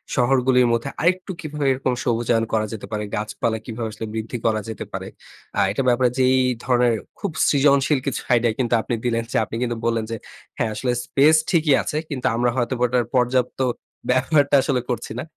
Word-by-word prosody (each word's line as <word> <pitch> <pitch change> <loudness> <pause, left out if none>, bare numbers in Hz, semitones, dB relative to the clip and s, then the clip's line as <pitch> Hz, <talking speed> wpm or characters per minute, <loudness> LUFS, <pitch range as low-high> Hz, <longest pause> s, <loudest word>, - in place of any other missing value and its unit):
শহরগুলির 125 0 +3
মধ্যে 115 +4 -1
আরেকটু 185 +3 +1
কিভাবে 150 -2 -4
এরকম 130 -1 0
সবুজায়ন 115 -1 +1
করা 110 -1 +2
যেতে 110 - -7
পারে, 105 0 -2
গাছপালা 110 +1 -2
কিভাবে 115 -1 -4
আসলে 110 +1 -6
বৃদ্ধি 110 +2 -4
করা 110 -1 +2
যেতে 110 - -5
পারে। - - -4 0.5
আ - - +2
এটার 130 +5 -1
ব্যাপারে 125 0 +3
যে 130 - +3
এই 130 - +3 0.2
ধরনের 125 -2 +3 0.3
খুব 200 - -2 0.2
সৃজনশীল 140 0 +3
কিছু 135 - -1
আইডিয়া 120 -2 +3
কিন্তু 120 -2 0
আপনি 120 - -4
দিলেন 115 -1 0
যে - - 0
আপনি 110 - -7
কিন্তু 120 -1 -2
বললেন 115 -1 0
যে - - -1 0.4
হ্যাঁ 115 - 0
আসলে 125 +3 -1
স্পেস 150 +3 +4
ঠিকই 160 -6 +3
আছে। 150 - -3
কিন্তু 130 -3 -5
আমরা 120 +1 +2
হয়তোবা 125 0 -1
ওটার 120 -1 +1
পর্যাপ্ত 125 +1 +1 0.5
ব্যবহারটা 140 +3 +3
আসলে 130 -4 0
করছি 120 - -4
না। - - -5
125 Hz, 185 wpm, -22 LUFS, 115-135 Hz, 0.5 s, স্পেস